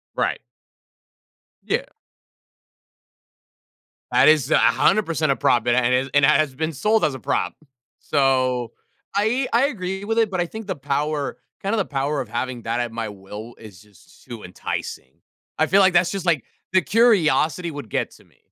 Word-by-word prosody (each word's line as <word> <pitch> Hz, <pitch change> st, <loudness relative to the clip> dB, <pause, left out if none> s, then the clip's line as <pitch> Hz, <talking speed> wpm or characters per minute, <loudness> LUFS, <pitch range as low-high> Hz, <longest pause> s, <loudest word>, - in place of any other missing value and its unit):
Right. -, -, 0 dB, 1.3 s
Yeah. -, -, -1 dB, 2.3 s
That 140 Hz, -, +5 dB
is 155 Hz, -3 st, +4 dB
100% 165 Hz, -6 st, +3 dB
a -, -, +2 dB
prop, 120 Hz, -2 st, +1 dB
and 120 Hz, -, +3 dB
it 125 Hz, 0 st, +2 dB
has 130 Hz, +2 st, +1 dB
and 145 Hz, -1 st, +5 dB
it -, -, +5 dB
has 150 Hz, -3 st, +2 dB
been 160 Hz, +2 st, -2 dB
sold 215 Hz, +9 st, +1 dB
as 150 Hz, -, 0 dB
a 130 Hz, -, -7 dB
prop. -, -, -1 dB, 0.5 s
So, 130 Hz, -3 st, +1 dB, 0.4 s
I 235 Hz, +6 st, +1 dB
I 245 Hz, +4 st, +4 dB
agree 190 Hz, -5 st, -4 dB
with 225 Hz, +2 st, -2 dB
it, 220 Hz, -3 st, +2 dB
but 185 Hz, -, -2 dB
I 175 Hz, -, 0 dB
think 220 Hz, +3 st, -8 dB
the 190 Hz, -, -2 dB
power 145 Hz, +1 st, -2 dB, 0.2 s
kind 200 Hz, +3 st, -1 dB
of -, -, -1 dB
the 195 Hz, -, +1 dB
power 140 Hz, +1 st, -2 dB
of 125 Hz, -, -7 dB
having 125 Hz, -1 st, -4 dB
that 115 Hz, +2 st, -2 dB
at 120 Hz, -1 st, -2 dB
my 115 Hz, -1 st, -4 dB
will 105 Hz, +4 st, -10 dB
is 100 Hz, -4 st, -13 dB
just 105 Hz, -4 st, -22 dB
too 115 Hz, -3 st, -9 dB
enticing, 80 Hz, -6 st, -6 dB, 0.5 s
I 155 Hz, -, +4 dB
feel 195 Hz, +1 st, +4 dB
like 185 Hz, -, +5 dB
that's 175 Hz, 0 st, +4 dB
just, 195 Hz, -2 st, -4 dB
like, 165 Hz, -8 st, +1 dB, 0.3 s
the 185 Hz, 0 st, +4 dB
curiosity 180 Hz, -, +2 dB
would 145 Hz, -8 st, -8 dB
get -, -, -2 dB
to -, -, -18 dB
me, -, -, -30 dB
150 Hz, 180 wpm, -22 LUFS, 125-190 Hz, 2.3 s, That